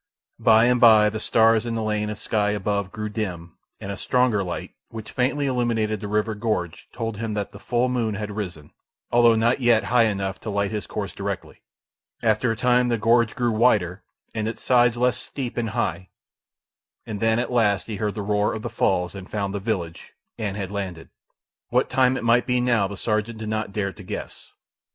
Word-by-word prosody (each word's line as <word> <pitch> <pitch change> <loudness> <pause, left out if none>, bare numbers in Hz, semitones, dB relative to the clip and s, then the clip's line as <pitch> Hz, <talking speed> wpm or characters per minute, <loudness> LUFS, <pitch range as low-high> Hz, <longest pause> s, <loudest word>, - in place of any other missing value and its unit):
By 110 0 +5
and 125 0 +3
by 110 -3 +7
the 110 - -4
stars 110 0 +3
in 115 -1 -3
the 115 - -2
lane 105 -1 -1
of 105 - -5
sky 105 -1 0
above 100 -1 -1
grew 105 -1 -4
dim, 90 -6 -5 0.2
and 100 - -6
a - - -4
stronger 125 -5 +1
light, 90 -2 -5 0.2
which 110 -1 -8
faintly 140 +3 0
illuminated 115 -5 0
the 105 - -5
river 105 +2 0
gorge, 105 -6 -3
told 115 -2 -4
him 110 -1 -3
that 100 -1 -3
the - - -12
full 120 +1 0
moon 120 -4 -1
had 105 0 -4
risen, 90 -8 -6 0.4
although 120 -1 +5
not 115 +3 +2
yet 120 -2 +4
high 120 -2 +6
enough 100 -2 -2
to 110 - -6
light 100 0 -1
his 105 -1 -4
course 100 -2 -4
directly. 100 -1 -5 0.6
After 110 +1 +2
a - - -1
time 125 +1 +3
the 120 -1 +1
gorge 115 +1 +3
grew 120 -1 +1
wider 105 -5 +2 0.3
and 110 -1 -2
its 115 - -5
sides 120 -1 +4
less 125 +1 +2
steep 130 -4 -4
and 115 -2 -1
high; 95 -2 -2 1.0
and 105 -2 -5
then, 115 +1 +2
at 125 +1 -2
last, 105 -5 +2
he 110 -3 -5
heard 105 -1 -2
the 105 - -3
roar 105 0 +1
of 110 - -6
the - - -4
falls, 90 -2 0
and 95 -2 -9
found 100 -2 -2
the 100 - -2
village, 95 -6 -4 0.2
and 105 -2 -3
had 100 -2 -4
landed. 95 -5 -5 0.6
What - - +1
time 130 0 +3
it - - -5
might 120 +1 +3
be 125 -1 +2
now 120 -5 +2
the 100 0 -7
sergeant 110 +2 -1
did 110 -1 -5
not 110 -1 -2
dare 100 -1 -2
to - - -12
guess. - - -8
110 Hz, 205 wpm, -24 LUFS, 100-120 Hz, 1.0 s, by